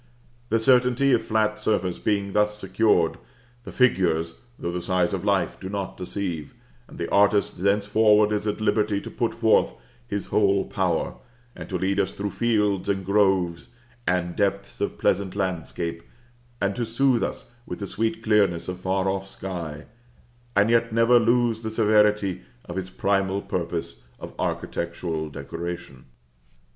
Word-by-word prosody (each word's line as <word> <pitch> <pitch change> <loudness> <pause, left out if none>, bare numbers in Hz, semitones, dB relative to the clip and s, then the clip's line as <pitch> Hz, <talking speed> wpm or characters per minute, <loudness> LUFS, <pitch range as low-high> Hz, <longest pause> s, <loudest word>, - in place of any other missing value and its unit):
The 115 - +3
certainty 125 +3 +4
of - - +3
flat 105 -1 0
surface 100 -5 0
being 100 -2 -1
thus 105 0 +2
secured, 95 -3 +2 0.5
the - - -7
figures, 85 -9 +2 0.2
though 85 - -3
the 90 0 -3
size 90 0 +1
of 95 -1 -2
life, 100 -4 0
do 95 - -6
not 100 -1 -4
deceive, 90 -5 -4 0.3
and - - -13
the - - -3
artist 100 -2 +3
thenceforward 105 +1 +4
is 105 0 -1
at 105 - -1
liberty 105 -2 +1
to - - -9
put 115 - -1
forth 115 -1 +3 0.3
his 100 -1 -3
whole 100 -2 +3
power, 90 -4 -1 0.4
and - - -9
to 95 - -1
lead 95 +2 0
us 95 - 0
through 100 0 -3
fields 105 -5 +1
and 95 -1 -1
groves, 95 -4 +1 0.4
and 90 -1 0
depths 100 -1 -1
of - - -2
pleasant 100 -2 0
landscape, 85 -3 -3 0.6
and 100 0 0
to 120 - 0
soothe 120 +1 +2
us - - -4 0.2
with - - -5
the 100 - -5
sweet 110 +2 -2
clearness 100 -6 +2
of 90 0 -5
far 95 +1 0
off 95 0 -2
sky, 85 -6 -6 0.7
and 105 +3 +4
yet 115 0 +3
never 115 +2 +5
lose 120 -1 +2
the 110 - -3
severity 105 -3 +2 0.2
of 85 - -7
his 95 -1 -4
primal 95 +1 0
purpose 85 -8 -4 0.2
of - - -8
architectural 85 -2 -3
decoration. 75 -1 -7
100 Hz, 155 wpm, -25 LUFS, 90-105 Hz, 0.7 s, never